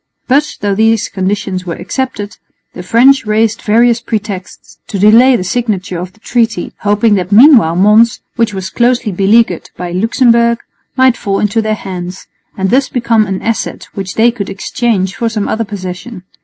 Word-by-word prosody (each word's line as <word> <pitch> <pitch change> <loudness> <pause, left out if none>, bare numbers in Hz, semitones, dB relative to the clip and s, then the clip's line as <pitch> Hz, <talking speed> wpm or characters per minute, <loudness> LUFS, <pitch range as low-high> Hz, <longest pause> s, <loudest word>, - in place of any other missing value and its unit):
But, 285 +4 +1
though 200 -1 0
these 225 +1 +1
conditions 190 -1 -3
were 170 - -3
accepted, 205 +1 -5 0.4
the 180 - -8
French 245 +9 +4
raised 220 +1 0
various 235 +2 +2
pretexts 205 -5 -6
to 200 - -4
delay 230 +6 +5
the 215 - -2
signature 200 -4 -2
of 180 +1 -7
the 220 - -26
treaty, 225 -5 -1
hoping 210 +2 +2
that 185 -1 -1
meanwhile 225 - +6
Mons, 210 +5 +4 0.2
which 230 -2 0
was 190 -1 -6
closely 240 -1 +1
beleaguered 195 0 +1
by 180 0 -5
Luxemburg, 235 +4 +2 0.3
might 260 -2 +3
fall 200 -3 -2
into 210 +2 0
their 215 0 -1
hands, 185 -2 -7 0.3
and 190 0 -1
thus 265 +2 +2
become 230 -3 +1
an 190 -1 -4
asset 215 -4 -3
which 190 -2 -6
they 235 +2 +3
could 205 -5 -6
exchange 195 -1 -2
for 230 +3 -1
some 215 -2 -3
other 225 +1 -2
possession. 185 +1 -7
215 Hz, 170 wpm, -12 LUFS, 190-235 Hz, 0.4 s, meanwhile